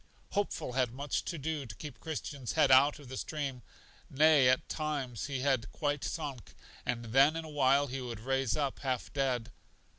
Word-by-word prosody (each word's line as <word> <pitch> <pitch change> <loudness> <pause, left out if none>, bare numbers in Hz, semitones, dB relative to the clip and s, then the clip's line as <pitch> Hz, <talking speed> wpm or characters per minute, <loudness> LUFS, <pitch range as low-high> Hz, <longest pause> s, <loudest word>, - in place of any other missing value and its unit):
Hopeful 200 -10 -1
had 125 -2 +1
much 140 +3 -2
to 170 - -3
do 150 -2 -3
to 110 - -8
keep 150 -4 -9
Christian's 145 -5 -4
head 155 -4 +4
out 140 +3 +6
of 145 -3 -13
the 130 +1 -6
stream; 140 -5 -3 0.5
nay, 145 -2 +5
at 130 - +2
times 140 - -3
he 135 -3 -3
had 130 -5 +1
quite 145 -1 -1
sunk, 145 -7 -5 0.3
and 120 -1 -1
then 135 +7 +5
in 165 0 -4
a - - -8
while 140 -1 +3
he 135 -1 -5
would 120 -3 -5
rise 135 +1 0
up 140 -3 -1
half 130 -3 -2
dead. 125 -5 0
135 Hz, 185 wpm, -32 LUFS, 125-150 Hz, 0.5 s, out